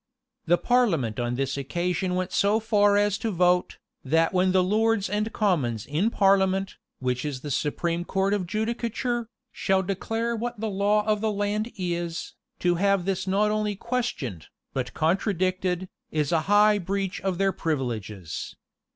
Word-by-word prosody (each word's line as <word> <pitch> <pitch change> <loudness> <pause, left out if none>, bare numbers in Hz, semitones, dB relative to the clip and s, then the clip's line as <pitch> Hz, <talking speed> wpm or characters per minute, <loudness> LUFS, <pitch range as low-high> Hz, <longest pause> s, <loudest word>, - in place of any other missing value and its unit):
[*] - - -55
The 175 +2 +5
parliament 175 - +1
on 120 0 -1
this 135 +1 -1
occasion 175 +6 -1
went 185 0 -2
so 205 +2 +3
far 205 -2 +3
as 205 0 +2
to 225 - -1
vote, 180 -2 +2 0.3
"That 160 +5 +2
when 185 0 +3
the 185 0 +4
lords 215 +2 +2
and 210 +3 -1
commons 140 - 0
in 160 +10 +1
parliament, 195 -2 +2 0.2
which 125 -1 -2
is 140 -4 -4
the 145 - -5
supreme 170 +5 -1
court 195 +2 0
of 190 -4 -1
judicature, 235 +3 -2 0.2
shall 190 0 +1
declare 225 +5 -2
what 240 0 -4
the 220 -1 -2
law 205 +2 +2
of 215 -1 +1
the 220 -1 +1
land 210 +2 -1
is, 175 -2 -3 0.3
to 175 -1 +3
have 200 -3 +2
this 195 -1 -1
not 205 +3 +2
only 210 -1 0
questioned, 235 - -3 0.3
but 130 -2 -3
contradicted, 185 +1 0 0.2
is 150 -2 -1
a 165 -2 +3
high 210 0 +5
breach 195 +1 -2
of 190 -2 -1
their 195 +1 +2
privileges." 110 - -4
190 Hz, 160 wpm, -26 LUFS, 165-210 Hz, 0.3 s, The